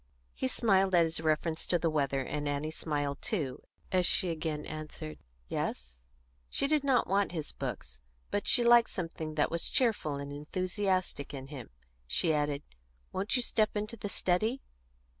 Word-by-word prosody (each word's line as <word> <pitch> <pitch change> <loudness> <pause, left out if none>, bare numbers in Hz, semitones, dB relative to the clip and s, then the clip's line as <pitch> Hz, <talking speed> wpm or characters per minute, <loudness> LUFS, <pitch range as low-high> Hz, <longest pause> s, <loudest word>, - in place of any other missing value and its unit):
He 130 - -1
smiled 190 - +3
at 170 - +7
his 160 0 -1
reference 160 +1 0
to 175 - +3
the 170 - 0
weather, 140 -3 +1
and 145 +2 -2
Annie 145 +2 -1
smiled 145 -3 -2
too 155 - -2 0.3
as 180 -1 +3
she 185 -3 +2
again 155 -2 -3
answered, 155 0 -6 0.3
"Yes?" - - -4 0.4
She - - +2
did 300 0 +2
not 265 -4 +4
want 195 -1 +1
his 155 -4 -3
books, - - -6 0.3
but 205 - -1
she 240 - +5
liked 235 0 +7
something 165 -3 -4
that 150 - +2
was 170 0 -1
cheerful 220 - +1
and 140 0 -5
enthusiastic 185 -1 -1
in 135 0 -7
him; 135 -6 -7 0.4
she 160 - +2
added, 145 -1 0 0.5
"Won't 200 +6 0
you 250 - +3
step 215 -2 +1
into 215 +3 -3
the 205 -2 -5
study?" 215 +8 +1
160 Hz, 165 wpm, -32 LUFS, 145-200 Hz, 0.5 s, at